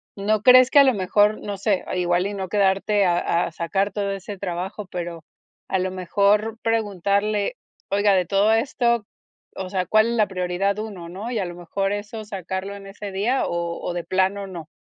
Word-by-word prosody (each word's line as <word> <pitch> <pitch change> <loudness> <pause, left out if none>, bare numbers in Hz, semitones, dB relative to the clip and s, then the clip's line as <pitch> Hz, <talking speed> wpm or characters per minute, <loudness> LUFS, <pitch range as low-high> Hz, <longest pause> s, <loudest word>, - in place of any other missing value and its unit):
¿no 210 +1 0
crees 255 +1 +7
que 285 - +7
a - - +9
lo 260 -4 +3
mejor, 205 +3 +2
no 205 -1 -5
sé 200 -2 +1
igual 175 0 +1
y 205 - -3
no 190 -2 -4
quedarte 200 0 +2
a 175 -1 +1
a - - -5
sacar 195 +5 -1
todo 200 0 -2
ese 195 0 -6
trabajo, 190 +2 -4
pero 170 -2 -6 0.5
a 190 - +1
lo 185 0 -1
mejor 205 +4 +1
preguntarle: 205 - 0 0.3
"Oiga 205 0 +3
de 185 - +2
todo 200 +4 +3
esto, 235 -3 +1 0.5
o 190 -1 -5
sea, 185 -1 -1
¿cuál 215 +3 +4
es 235 - -1
la 215 -3 +2
prioridad 190 +2 -1
1, 190 -6 -6
no?". 200 +7 -6
Y 230 -3 -2
a 190 - -1
lo 175 0 -7
mejor 195 +3 -2
eso 210 +2 -5
sacarlo 190 -1 -5
en 195 -1 -11
ese 200 0 -7
día 225 +8 0
o 170 0 -3
o 175 - -3
de 175 - -3
plano, 190 +2 0
no. 170 -5 -8
200 Hz, 200 wpm, -23 LUFS, 185-210 Hz, 0.5 s, a